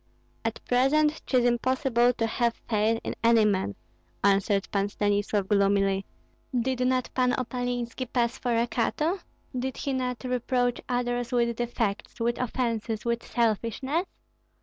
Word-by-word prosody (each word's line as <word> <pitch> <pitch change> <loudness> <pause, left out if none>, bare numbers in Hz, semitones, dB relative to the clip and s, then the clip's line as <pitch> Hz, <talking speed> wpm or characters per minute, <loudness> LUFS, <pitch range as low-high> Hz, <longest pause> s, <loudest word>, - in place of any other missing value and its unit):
"At 225 0 -2
present 295 +5 +3
'tis 250 -2 +3
impossible 245 0 +2
to 225 - -1
have 235 +1 0
faith 220 +1 +2
in - - -3
any 230 -1 +5
man," 190 - 0 0.5
answered 195 0 +3
Pan 200 0 +1
Stanislav, 205 -1 0
gloomily. 195 -1 +2 0.5
"Did 255 +1 -1
not 255 -1 0
Pan 250 -1 +2
Opalinski 245 -1 -3
pass 235 -2 +1
for 240 -2 0
a 230 - +3
Cato? 305 +10 0 0.4
Did 255 +1 -2
he 275 - -2
not 250 -1 -2
reproach 250 -1 0
others 245 -1 -1
with 235 -1 +1
defects, 230 -3 -2
with 235 +1 0
offences, 230 -3 -2
with 235 0 0
selfishness? 240 - 0
240 Hz, 135 wpm, -27 LUFS, 220-250 Hz, 0.5 s, any